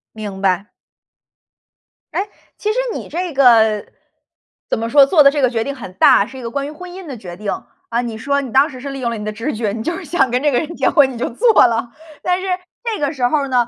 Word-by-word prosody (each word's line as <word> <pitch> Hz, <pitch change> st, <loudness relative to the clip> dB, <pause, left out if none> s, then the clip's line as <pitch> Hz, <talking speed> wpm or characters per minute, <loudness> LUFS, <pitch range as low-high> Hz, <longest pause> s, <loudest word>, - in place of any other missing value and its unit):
明 205 Hz, -3 st, -6 dB
白。 190 Hz, 0 st, +1 dB, 1.5 s
哎， 405 Hz, -, -1 dB, 0.3 s
其 420 Hz, -, -2 dB
实 480 Hz, -, -3 dB, 0.2 s
你 -, -, -7 dB
这 350 Hz, -1 st, -3 dB
个 225 Hz, -6 st, +4 dB, 0.8 s
怎 -, -, 0 dB
么 230 Hz, 0 st, -2 dB
说， 280 Hz, 0 st, +7 dB
做 300 Hz, 0 st, +5 dB
的 275 Hz, -, +7 dB
这 290 Hz, -, -1 dB
个 255 Hz, -, +4 dB
决 225 Hz, -2 st, -1 dB
定 280 Hz, +3 st, -4 dB
很 200 Hz, -8 st, -9 dB
大， 195 Hz, +1 st, +5 dB
是 265 Hz, -, -11 dB
一 -, -, -8 dB
个 230 Hz, -, -5 dB
关 280 Hz, +1 st, -2 dB
于 -, -, -7 dB
婚 360 Hz, +3 st, -10 dB
姻 370 Hz, 0 st, -9 dB
的 270 Hz, -5 st, -7 dB
决 175 Hz, -4 st, -9 dB
定。 210 Hz, -1 st, -3 dB, 0.4 s
啊， 235 Hz, +1 st, 0 dB
你 230 Hz, -2 st, -5 dB
说 280 Hz, +5 st, 0 dB
你 260 Hz, -4 st, -7 dB
当 275 Hz, +4 st, +4 dB
时 255 Hz, -2 st, -10 dB
是 280 Hz, -, -5 dB
利 275 Hz, 0 st, -6 dB
用 240 Hz, -2 st, -1 dB
了 230 Hz, -, -3 dB
你 210 Hz, -, -6 dB
的 215 Hz, -, -3 dB
直 230 Hz, +8 st, -4 dB
觉， 215 Hz, -2 st, -1 dB
你 220 Hz, +1 st, -4 dB
就 340 Hz, +4 st, -2 dB
是 390 Hz, -, -7 dB
想 305 Hz, -4 st, +1 dB
跟 250 Hz, -, +1 dB
这 295 Hz, -, +3 dB
个 245 Hz, -, +2 dB
人 330 Hz, +2 st, -5 dB
结 -, -, +2 dB
婚 275 Hz, -4 st, +4 dB
你 240 Hz, -, -8 dB
就 240 Hz, -, -2 dB
做 430 Hz, -, +5 dB
了， 230 Hz, 0 st, -2 dB, 0.3 s
但 360 Hz, +1 st, 0 dB
是 385 Hz, -, -4 dB, 0.4 s
这 450 Hz, -3 st, -2 dB
个 290 Hz, +1 st, -1 dB
时 260 Hz, -4 st, -1 dB
候 285 Hz, 0 st, 0 dB
呢， 245 Hz, -3 st, +2 dB
260 Hz, 280 characters per minute, -18 LUFS, 230-300 Hz, 1.5 s, 说